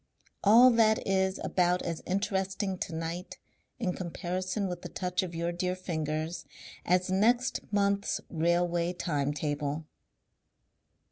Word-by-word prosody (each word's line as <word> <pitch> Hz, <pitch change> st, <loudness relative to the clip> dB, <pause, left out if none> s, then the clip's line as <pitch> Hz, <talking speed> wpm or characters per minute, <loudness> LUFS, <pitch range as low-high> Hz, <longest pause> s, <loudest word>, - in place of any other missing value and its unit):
"All 235 Hz, +5 st, +8 dB
that 220 Hz, -2 st, +3 dB
is 190 Hz, 0 st, +1 dB
about 180 Hz, 0 st, +1 dB
as 165 Hz, -2 st, -3 dB
interesting 190 Hz, 0 st, -1 dB
to 170 Hz, -, -4 dB
night 165 Hz, +2 st, -5 dB, 0.4 s
in 195 Hz, -7 st, -1 dB
comparison 185 Hz, +3 st, -3 dB
with 180 Hz, -1 st, -5 dB
the -, -, -7 dB
touch 180 Hz, 0 st, -1 dB
of 175 Hz, -3 st, -5 dB
your 170 Hz, +1 st, -1 dB
dear 180 Hz, +1 st, -1 dB
fingers 160 Hz, -2 st, -3 dB, 0.4 s
as 180 Hz, +1 st, +2 dB
next 240 Hz, +7 st, +2 dB
month's 200 Hz, -1 st, +1 dB
railway 170 Hz, +1 st, +1 dB
time 145 Hz, -5 st, -1 dB
table." 150 Hz, +1 st, -2 dB
180 Hz, 125 wpm, -30 LUFS, 170-195 Hz, 0.4 s, All